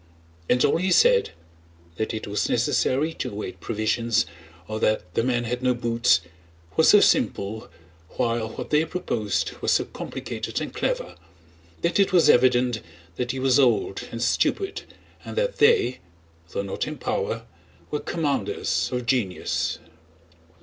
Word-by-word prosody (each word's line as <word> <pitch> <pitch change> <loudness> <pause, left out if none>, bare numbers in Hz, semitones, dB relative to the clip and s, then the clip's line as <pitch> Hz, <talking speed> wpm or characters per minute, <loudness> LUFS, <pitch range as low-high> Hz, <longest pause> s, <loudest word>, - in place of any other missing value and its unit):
And 125 0 +4
all - - +3
he 185 +3 0
said—that 85 - 0
it 110 - -4
was 105 0 -1
necessary 150 +5 +1
to 125 - -4
await 105 -1 -6
provisions, 115 0 0 0.4
or 110 0 -4
that 100 -5 0
the 115 - +1
men 120 -1 0
had 120 +1 -3
no 125 -1 +2
boots—was 85 -8 0
so - - +8
simple, 105 +3 +1 0.5
while 115 -1 0
what - - -7
they 150 +1 +4
proposed 120 - -2
was - - +2
so - - +2
complicated - - -5
and - - -5
clever, - - -2 0.7
that 170 +3 +1
it 195 - +4
was 170 -5 +5
evident 125 -2 +3 0.4
that 125 -1 -2
he 130 - -2
was 130 +1 +3
old 115 -7 +2
and 115 0 -3
stupid 385 - 0 0.4
and - - -8
that - - 0
they, 440 - +4 0.5
though 100 - -3
not 100 - -3
in - - -5
power, - - -2 0.5
were 150 - -1
commanders 150 -4 -1
of 125 -1 -2
genius. 115 -7 -1
120 Hz, 145 wpm, -24 LUFS, 105-135 Hz, 0.7 s, so